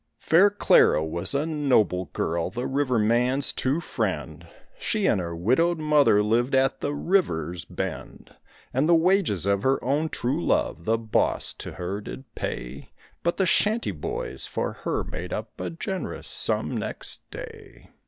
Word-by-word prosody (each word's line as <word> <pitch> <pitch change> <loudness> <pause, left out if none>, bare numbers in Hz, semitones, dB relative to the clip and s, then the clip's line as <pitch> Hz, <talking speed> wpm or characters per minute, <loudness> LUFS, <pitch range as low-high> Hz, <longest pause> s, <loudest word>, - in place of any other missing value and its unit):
Fair 180 +6 +5
Clara 195 - +4
was 85 - 0
a 145 +2 +1
noble 125 - +1
girl, 85 +2 -2
the 120 +1 -4
river 135 -3 0
man's 120 +5 +2
true 135 +5 0
friend; - - -4 0.3
She 215 - 0
and 95 - +2
her 85 -1 -5
widowed 130 - +2
mother 150 -9 +4
lived 120 +5 +1
at 135 0 +2
the 145 - -1
river's 90 - 0
bend; - - -6 0.4
And 135 +6 +1
the 170 - +7
wages 165 - +2
of 100 0 +1
her 135 +3 +2
own 145 +5 0
true 140 +7 -2
love 85 - 0
the 115 +1 +2
boss 110 -1 +1
to - - -8
her 95 +3 -4
did 125 +2 -10
pay, - - -6 0.3
But 170 - 0
the 190 - +2
shanty 215 - +2
boys 75 -6 -4
for - - -3
her - - 0
made 90 +2 -7
up 110 +1 -5
a - - -3
generous 185 +3 -5
sum - - 0
next - - -1
day. 450 -5 -11
130 Hz, 160 wpm, -25 LUFS, 100-165 Hz, 0.4 s, the